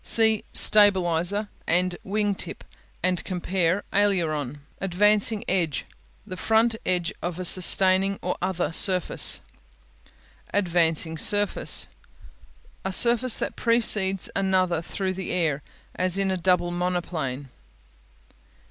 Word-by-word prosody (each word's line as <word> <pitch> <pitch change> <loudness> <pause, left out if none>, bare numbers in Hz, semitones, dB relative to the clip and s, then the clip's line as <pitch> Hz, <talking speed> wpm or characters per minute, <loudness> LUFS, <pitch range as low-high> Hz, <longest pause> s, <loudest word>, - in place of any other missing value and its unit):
See 220 -2 +6
"Stabilizer'" 195 -1 +2 0.2
and 180 +1 0
"Wing 205 +1 -1
tip" - - -8 0.4
and 180 -1 -1
compare 185 0 -2
"Aileron." 155 -9 -1 0.2
Advancing 210 +3 +1
Edge 170 -6 -2 0.4
The 185 -3 -9
front 225 +3 +1
edge 180 -2 -1
of 175 -1 -5
a 185 - -5
sustaining 190 +2 +4
or 180 - -2
other 180 -2 -2
surface. 180 +1 +2 1.1
Advancing 165 -4 0
Surface 205 +3 +3 1.0
A 190 - -3
surface 235 +4 +4
that - - -4
precedes 210 -5 0
another 185 -3 0
through 190 +2 -4
the 190 0 -6
air, 155 -5 -1 0.3
as 185 0 -2
in 195 -1 0
a - - -1
double 180 -1 0
monoplane. 170 -7 -4
185 Hz, 110 wpm, -24 LUFS, 175-200 Hz, 1.1 s, See